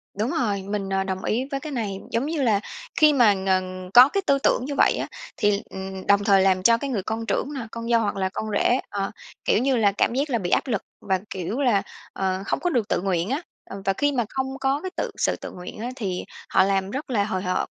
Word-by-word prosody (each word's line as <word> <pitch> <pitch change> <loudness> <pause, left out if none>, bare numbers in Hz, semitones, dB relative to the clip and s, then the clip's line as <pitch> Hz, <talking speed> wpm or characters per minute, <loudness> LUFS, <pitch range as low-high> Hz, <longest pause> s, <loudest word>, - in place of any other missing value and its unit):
Đúng 215 +6 -1
rồi, 205 -5 0
mình, 195 0 -3
à, 195 0 +1
đồng 190 0 -4
ý 245 +4 0
với 275 - -1
cái 310 +1 -7
này. 210 -7 -3
Giống 230 +4 0
như 310 -1 -2
là 220 -6 +3 0.4
khi 305 -1 +6
mà, 240 -7 +5
ừm, 185 -1 -1
có 250 +3 +9
cái 395 - 0
tư 280 - +4
tưởng 250 - +2
như 285 +1 -4
vậy - - +4
á, - - -3 0.3
thì, 205 0 +2
ừm, 190 0 -7
đồng 200 0 +4
thời 200 -2 +5
làm 190 -1 +3
cho 230 +3 +6
cái 280 +4 -4
người 215 -8 -1
con 225 +3 -3
trưởng 280 +5 -1
nè, 255 -5 -5
con 230 0 -5
dâu 230 -1 +4
hoặc 210 - -1
là 190 -1 0
con 190 - -4
rể, 240 +5 +2
à, 195 -1 -2 0.3
kiểu - - +3
như 265 +2 +2
là, 210 -3 +4
cảm 200 - +1
giác 280 +4 0
là 240 - +1
bị 180 -5 -3
áp - - +2
lực 220 -7 0 0.2
và, 190 -1 0
kiểu 190 +7 -3
là, 235 -7 +3 0.3
ờ, 190 -1 -1
không - - -1
có 355 - 0
được 240 -10 0
tự - - 0
nguyện 185 -1 0
á. 275 +5 -1 0.3
Ờ, 195 - -7
và 195 - +2
khi 290 +8 +1
mà 245 -5 0
không 265 0 -2
có 270 +2 +1
cái 375 - -5
tự - - -1
sự - - +1
tự - - -8
nguyện 180 +3 -9
á 235 +3 -3
thì 190 -7 -3 0.2
họ - - +5
làm 195 0 0
rất 275 +4 -5
là 220 -5 +2
hời 190 -3 -2
hợt. 185 -1 0
210 Hz, 265 wpm, -24 LUFS, 195-260 Hz, 0.4 s, có